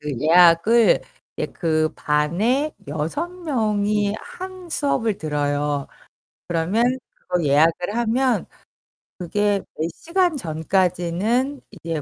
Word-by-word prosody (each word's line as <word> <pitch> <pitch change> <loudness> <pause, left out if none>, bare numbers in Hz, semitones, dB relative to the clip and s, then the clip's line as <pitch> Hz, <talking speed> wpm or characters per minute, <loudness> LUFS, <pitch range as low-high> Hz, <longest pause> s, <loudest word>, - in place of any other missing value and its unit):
그 150 0 -4
예약을 175 +8 +5 0.4
이제 - - -2
그 155 -2 0
반에 200 - 0 0.2
6 160 - -2
명이 210 - 0
한 370 -1 -9
수업을 255 - 0
들어요. 145 -2 -1 0.6
그러면 175 +7 +1 0.3
그거 180 -1 -2
예약을 165 +7 +2
하면 240 +2 +1 0.7
그게 200 +3 0 0.2
몇 160 +2 -1
시간 345 - 0
전까지는 185 - 0
이제 165 -4 -4
190 Hz, 195 characters per minute, -22 LUFS, 160-240 Hz, 0.7 s, 예약을